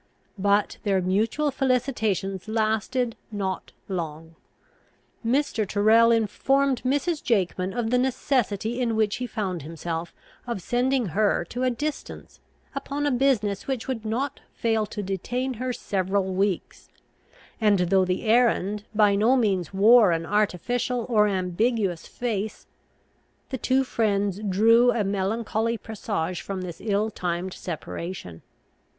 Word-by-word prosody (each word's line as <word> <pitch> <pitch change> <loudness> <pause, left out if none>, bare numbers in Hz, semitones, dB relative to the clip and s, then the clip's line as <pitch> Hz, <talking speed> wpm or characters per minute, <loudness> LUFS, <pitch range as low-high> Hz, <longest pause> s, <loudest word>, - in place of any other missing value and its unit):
But 200 +1 +2
their 195 -3 +1
mutual 220 +11 +1
felicitations 225 -8 0
lasted 220 +2 0 0.2
not 195 -3 -3 0.2
long. 165 -3 -5 0.9
Mr. 235 -3 +1
Tyrrel 220 +3 +5
informed 260 +4 +2
Mrs. 290 +5 0
Jakeman 190 -4 0
of 230 +1 -2
the 250 - +3
necessity 245 -3 0
in 230 -2 0
which 215 -2 +1
he 250 - -3
found 190 -8 -3
himself 165 +2 -5 0.4
of 235 -4 -2
sending 245 +2 0
her 200 0 +1
to 245 - -4
a 255 - +3
distance, 290 +5 -5 0.3
upon 280 +1 -3
a 290 - +2
business 240 -6 +1
which 265 -4 -3
would 250 -4 -3
not 255 +6 -2 0.2
fail 225 -2 0
to 210 0 -5
detain 245 +7 -2
her 255 0 -1
several 190 -3 -1
weeks; 195 -1 -2 0.7
and, 210 -2 +4
though 185 +1 +3
the 185 0 -1
errand 215 -3 +2
by 210 -1 +5
no 220 +6 +4
means 200 -8 +1
wore 210 +1 +6
an 165 0 -2
artificial 220 +5 0
or 210 -3 +4
ambiguous 190 0 0
face, 220 -3 -3 0.9
the 260 - -1
two 260 +3 +2
friends 205 -5 0
drew 225 +4 +4
a 225 - 0
melancholy 220 +3 -1
presage 200 -5 -3
from 195 -2 -5
this 175 -2 -7
ill 210 0 0
timed 180 0 -3
separation. 170 - -6
215 Hz, 130 wpm, -25 LUFS, 190-245 Hz, 0.9 s, wore